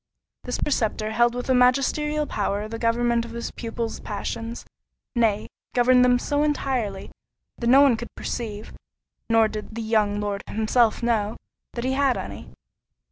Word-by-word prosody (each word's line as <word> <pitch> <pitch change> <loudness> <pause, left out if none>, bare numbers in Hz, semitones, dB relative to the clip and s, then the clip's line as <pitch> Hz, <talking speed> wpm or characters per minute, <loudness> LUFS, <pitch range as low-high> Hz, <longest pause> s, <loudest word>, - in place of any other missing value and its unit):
This - - -2
preceptor 220 -6 -1
held 240 +2 +3
with 245 - -4
a 260 - +3
magisterial 275 +4 +2
power 205 -3 -2
the 225 +1 -6
government 235 0 +1
of 230 0 -9
his 235 0 -4
pupil's 230 -1 -4
passions; 225 +3 -5 0.5
nay, 220 -3 +2 0.3
governed 250 +1 +5
them 250 0 +5
so 290 +4 -1
entirely, 260 -9 -1 0.5
that 235 - -2
no 265 +3 +7
one 275 -4 +5
could 235 +1 -8
perceive 215 -3 -5 0.6
(nor 225 -1 +5
did 215 +1 -7
the 230 - -3
young 210 -2 +1
Lord 205 -1 -2
himself 220 +2 +1
know) 220 -2 0 0.4
that 235 - -4
he 260 +1 0
had 275 -1 +2
any. - - -7
235 Hz, 155 wpm, -24 LUFS, 215-250 Hz, 0.6 s, no